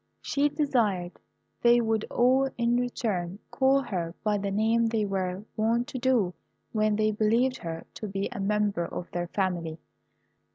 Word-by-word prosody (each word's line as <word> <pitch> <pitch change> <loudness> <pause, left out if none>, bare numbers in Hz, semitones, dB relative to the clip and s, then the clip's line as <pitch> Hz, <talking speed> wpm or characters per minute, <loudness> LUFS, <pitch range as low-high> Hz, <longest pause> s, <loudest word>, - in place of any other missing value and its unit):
She 290 +1 +1
desired 220 - 0 0.4
they 240 0 +6
would 225 -2 0
all, 260 +2 +3
in 235 0 +2
return, 205 -7 -2
call 270 0 +3
her 175 -7 -3
by 210 -2 +1
the 200 0 -2
name 225 +3 +2
they 220 -2 0
were 190 -1 -2
wont 230 +2 +1
to 260 - -4
do 240 -8 +2 0.4
when 215 -1 +2
they 215 0 +2
believed 230 +5 +2
her 165 -4 -6
to 215 - -6
be 195 0 -2
a - - -6
member 200 -3 0
of 175 - -7
their 175 0 -2
family. 175 -4 -2
215 Hz, 160 wpm, -28 LUFS, 190-240 Hz, 0.4 s, they